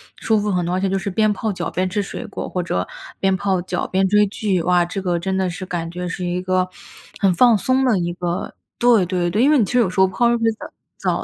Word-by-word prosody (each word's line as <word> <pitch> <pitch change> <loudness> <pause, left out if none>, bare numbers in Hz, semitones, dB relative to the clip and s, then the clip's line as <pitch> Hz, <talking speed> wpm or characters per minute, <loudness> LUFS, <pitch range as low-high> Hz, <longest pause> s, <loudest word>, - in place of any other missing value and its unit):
舒 220 -1 +1
服 210 0 -1
很 180 -3 0
多， 175 - -2
而 185 - 0
且 195 - 0
就 195 - 0
是 195 +1 -3
边 215 +2 +2
泡 220 +1 -2
脚 175 -3 -4
边 185 +2 -1
吃 205 +2 -1
水 200 - -6
果， - - -6
或 180 - -3
者 90 - -2 0.3
边 190 -1 +2
泡 190 -1 0
脚 185 - -3
边 190 +1 +1
追 210 +2 +4
剧。 195 -3 -1
哇， 180 0 +3
这 195 +3 -4
个 175 -2 0
真 190 +2 -2
的 190 -1 0
是 180 +2 -6
感 170 -2 -4
觉 180 +1 -5
是 180 +1 -5
一 175 +1 -2
个 185 0 0 0.5
很 195 -2 +3
放 235 +5 +5
松 255 +7 +1
的 240 -7 +2
一 175 0 -2
个 175 0 -3 0.2
对 235 -6 +4
对 175 -1 -1
对。 210 +7 +1
因 285 - +5
为 300 - +5
你 220 - +3
其 - - -6
实 250 - +4
有 225 -6 +3
时 185 - -3
候 190 - +6
泡 235 +6 +1
热 235 - +2
水 230 0 +2 0.5
澡 - - -1
190 Hz, 295 characters per minute, -20 LUFS, 180-210 Hz, 0.5 s, 候